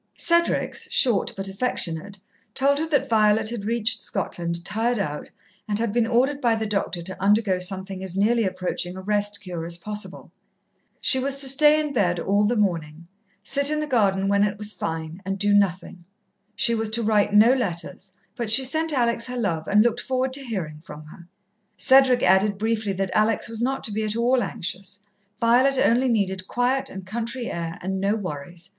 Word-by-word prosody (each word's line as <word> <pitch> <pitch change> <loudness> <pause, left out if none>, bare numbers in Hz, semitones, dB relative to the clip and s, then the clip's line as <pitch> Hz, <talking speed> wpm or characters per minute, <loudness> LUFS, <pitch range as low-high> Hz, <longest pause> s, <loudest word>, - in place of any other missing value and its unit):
Cedric's, 340 0 +1
short 235 -8 +3
but 195 0 -3
affectionate, 195 -3 -1 0.4
told 280 +2 +2
her 320 - -2
that 285 -4 +1
Violet 215 -1 +3
had 225 -4 -5
reached 230 +1 +1
Scotland 170 -4 -4
tired 230 +4 0
out, 150 -8 -4 0.4
and 205 -1 -1
had 225 -2 -2
been 235 -1 +1
ordered 270 +5 +1
by 235 -3 +2
the 220 0 -3
doctor 195 -4 -2
to 185 +1 -7
undergo 200 -1 +2
something 190 +1 -3
as 185 -1 -5
nearly 225 +4 +2
approaching 185 -1 -3
a - - -7
rest 205 +1 -1
cure 180 -4 -6
as 170 +1 -3
possible. 210 +4 -7 0.7
She 260 - +2
was 275 +1 -1
to 275 - +2
stay 295 +3 +5
in 300 -2 -3
bed 180 -7 +1
all 200 +4 +1
the 235 +4 +1
morning, 170 -6 -2 0.4
sit 280 +5 +2
in 305 0 -1
the 305 - -2
garden 200 -8 +1
when 200 0 +3
it 205 0 -1
was 210 0 -1
fine, 160 +2 -5
and 195 0 -3
do 205 +1 +1
nothing. 185 -3 0 0.5
She 235 - +2
was 225 -1 -1
to 235 - -2
write 210 -1 +2
no 225 +4 +7
letters, 190 -4 -4 0.2
but 235 -3 -4
she 265 +5 +7
sent 315 +5 +1
Alex 235 -3 0
her 250 0 -5
love 165 -9 -2
and 210 +1 +4
looked 240 0 0
forward 260 0 -2
to 275 +1 -3
hearing 170 - -5
from 150 -1 -11
her. 170 +3 -14 0.5
Cedric 260 -2 +4
added 195 +2 +3
briefly 220 -1 -1
that 190 0 -3
Alex 215 +1 +1
was 230 -1 -5
not 265 +2 -1
to 220 - -1
be 215 +2 -2
at 215 0 -2
all 245 +2 +2
anxious. 195 +2 -5 0.4
Violet 255 +4 +3
only 255 +1 +2
needed 190 -4 -1
quiet 260 +2 -1
and 190 -1 -9
country 235 +4 -4
air, 165 -1 -5
and 190 +1 -3
no 200 +2 +1
worries. 175 -2 -7
210 Hz, 190 wpm, -23 LUFS, 190-240 Hz, 0.7 s, no